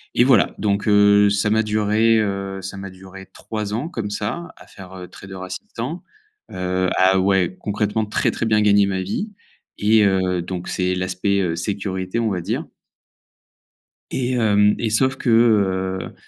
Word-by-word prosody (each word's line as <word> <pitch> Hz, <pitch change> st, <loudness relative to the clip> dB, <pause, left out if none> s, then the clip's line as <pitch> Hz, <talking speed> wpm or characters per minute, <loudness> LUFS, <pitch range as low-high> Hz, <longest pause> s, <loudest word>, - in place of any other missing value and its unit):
et 120 Hz, -, +5 dB
voilà, 125 Hz, -5 st, +4 dB
donc 100 Hz, +1 st, -1 dB
heu, 100 Hz, 0 st, +5 dB
ça 100 Hz, +1 st, +1 dB
m'a 110 Hz, +1 st, +2 dB
duré, 110 Hz, +1 st, +2 dB
heu, 100 Hz, -2 st, -3 dB
ça 95 Hz, +1 st, -7 dB
m'a 100 Hz, 0 st, -7 dB
duré 95 Hz, +1 st, -12 dB
3 105 Hz, -2 st, -5 dB
ans 135 Hz, +9 st, -3 dB
comme 110 Hz, -, -4 dB
ça, 110 Hz, +12 st, -4 dB
à -, -, -16 dB
faire, 95 Hz, -1 st, -13 dB
heu, 90 Hz, -1 st, -9 dB
trader 95 Hz, -1 st, -11 dB
assistant, 115 Hz, -, -6 dB, 0.5 s
heu, 90 Hz, 0 st, -1 dB
à, 95 Hz, 0 st, +4 dB
ouais, 95 Hz, -2 st, +1 dB
concrètement, 105 Hz, +1 st, -1 dB
très 105 Hz, -, 0 dB
très -, -, -3 dB
bien 105 Hz, -1 st, +2 dB
gagner 100 Hz, -1 st, +4 dB
ma 95 Hz, -1 st, -2 dB
vie 195 Hz, -, -4 dB, 0.5 s
et 105 Hz, +1 st, +4 dB
heu, 95 Hz, -2 st, +1 dB
donc 90 Hz, 0 st, -6 dB
c'est 90 Hz, 0 st, -1 dB
l'aspect, 95 Hz, +2 st, -1 dB
heu, 85 Hz, -3 st, -1 dB
sécurité, 95 Hz, +2 st, -3 dB
on 115 Hz, -2 st, 0 dB
va 90 Hz, -3 st, -2 dB
dire -, -, -3 dB, 1.5 s
et 130 Hz, -1 st, -2 dB
hem, 105 Hz, -3 st, +3 dB
et 115 Hz, -2 st, -1 dB
sauf 130 Hz, +4 st, +2 dB
que, 120 Hz, -, -1 dB
heu, 95 Hz, -5 st, +2 dB
100 Hz, 170 wpm, -21 LUFS, 95-110 Hz, 1.5 s, et